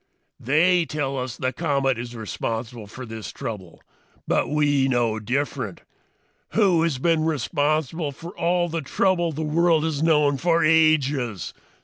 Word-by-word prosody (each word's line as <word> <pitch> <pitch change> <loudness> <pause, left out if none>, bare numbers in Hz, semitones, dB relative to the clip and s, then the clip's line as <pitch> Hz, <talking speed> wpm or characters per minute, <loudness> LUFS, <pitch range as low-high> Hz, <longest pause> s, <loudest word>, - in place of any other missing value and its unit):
"They 170 +7 +3
tell 145 -3 -3
us 125 -2 -5
the 130 0 -2
comet 140 -6 0
is 120 0 -6
responsible 115 0 -5
for 125 +5 -9
this 110 -2 -7
trouble. 95 -7 -7 0.4
But - - +1
we 145 -2 +2
know 120 -4 +1
different. 130 +7 -3 0.7
Who 190 -7 +3
has 165 -5 0
been 160 +3 +1
responsible 155 0 -1
for 165 +6 -10
all 175 0 +1
the 165 -1 -3
trouble 175 +3 +1
the 155 +1 -4
world 160 +1 +2
has 155 -3 -1
known 150 -3 +3
for 170 +1 +2
ages? 145 - +2
145 Hz, 140 wpm, -23 LUFS, 125-165 Hz, 0.7 s, They